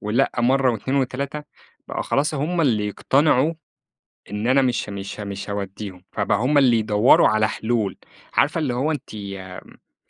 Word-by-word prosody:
ولأ 105 +2 +1
مرّة 130 +2 +3
و2 130 +5 -2
و3 140 +3 -2 0.5
بقى - - -3
خلاص 150 +3 0
هم 165 +5 -1
اللي 110 -8 +2
يقتنعوا 140 - +2 0.8
إن 105 +2 -3
أنا 135 +2 +4
مش 125 -4 0
مش 100 +1 -6
مش 100 0 -6
هاوديهم، 100 -2 -6
فبقى - - 0
هم 140 +5 +2
اللي 125 -4 +5
يدوروا 105 +2 +4
على 110 0 +2
حلول. 110 -4 -1 0.4
عارفة 145 - +2
اللي 140 -6 -1
هو 140 +6 0
أنتِ 135 -6 -7
ال 100 -3 -10
120 Hz, 155 wpm, -22 LUFS, 105-140 Hz, 0.8 s, اللي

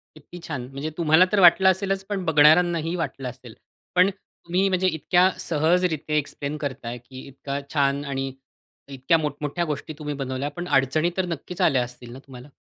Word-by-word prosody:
किती 155 +4 -12
छान! 135 -7 -5
म्हणजे 145 +3 -4
तुम्हाला 160 +2 +5
तर 205 - +3
वाटलं 185 +2 +7
असेलच, 195 +1 -1
पण 195 -3 -3
बघणाऱ्यांना 160 +2 +5
ही 165 +2 -3
वाटलं 135 -5 -4
असेल. 125 -2 -11 0.4
पण 180 +2 +5
तुम्ही, 190 0 -3
म्हणजे 185 0 +1
इतक्या 180 +2 +3
सहजरीत्या 160 -1 0
एक्सप्लेन 145 0 -3
करताय 125 -4 -5
की 130 +2 -12
इतका 140 +1 -5
छान 140 0 +1
आणि 135 -1 -3 0.6
इतक्या 135 +5 +1
मोठमोठ्या 150 +2 -3
गोष्टी 150 0 -5
तुम्ही 150 -1 -4
बनवल्या, 135 0 -3
पण 175 +4 -7
अडचणी 155 +6 +2
तर 185 - +1
नक्कीच 175 +3 -6
आल्या 140 -8 +3
असतील 120 0 -11
ना 130 - -9
तुम्हाला? 130 +1 -12
150 Hz, 170 wpm, -24 LUFS, 135-175 Hz, 0.6 s, वाटलं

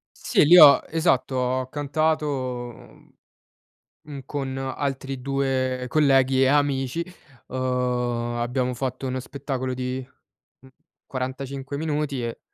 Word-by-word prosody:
Sì, - - +2
li 175 +4 +8
ho 145 -4 +9
esatto. 155 -5 +1
Ho 130 0 -1
cantato, 155 +2 0 0.5
mhmm, - - -18 0.9
mhmm, 145 -2 -8
con 135 -2 -4
altri 135 0 -4
2 130 -1 -1
colleghi 135 -2 +3
e 135 - +5
amici. 140 +1 +1 0.4
Uhm, 130 - -5 0.8
abbiamo 125 +1 -1
fatto 130 +1 -4
uno 130 0 -2
spettacolo 130 -1 -4
di, 125 0 -4 0.6
mhmm, 130 - -18 0.4
45 135 +1 -5
minuti 150 -4 -2
e 115 -1 -5
135 Hz, 115 wpm, -24 LUFS, 130-145 Hz, 0.9 s, ho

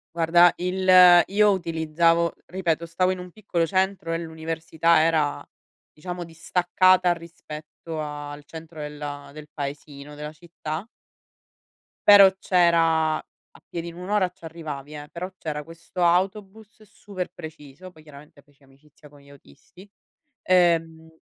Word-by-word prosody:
Guarda 170 +1 +5
il 185 +1 -3 0.4
io 210 +2 +3
utilizzavo 165 -1 +1
ripeto 170 -3 -2
stavo 175 +2 0
in 185 - -1
un 180 0 -9
piccolo 175 -4 -2
centro 190 -2 -1
e 165 - -1
l'università 160 0 0
era, 155 -3 +1 0.5
diciamo, 175 +2 -7
distaccata 180 +2 +2
rispetto 165 -1 -10
al 145 -1 -7
centro 160 0 -11
della 145 -1 -7
del 150 0 -11
paesino, 145 0 -7
della 150 +1 -7
città 160 +1 -7 1.2
però 200 -2 +9
c'era 165 -4 +2
a - - -18
piedi, 170 0 -6
un'ora, 185 +2 0
ci 180 -1 -31
arrivavi, 155 -3 -8
eh. 145 0 -9
Però, 180 +2 -6
c'era 150 -3 -5
questo 165 +3 -6
autobus 195 +4 -1
super 200 -3 -7
preciso. 160 +1 -11
Poi, 160 -3 -19
chiaramente, 145 -1 -16
feci 145 0 -30
amicizia 140 +3 -21
con 145 -1 -19
gli 140 - -20
autisti, 140 - -18 0.5
ehm, 165 -3 +2
165 Hz, 125 wpm, -24 LUFS, 150-180 Hz, 1.2 s, però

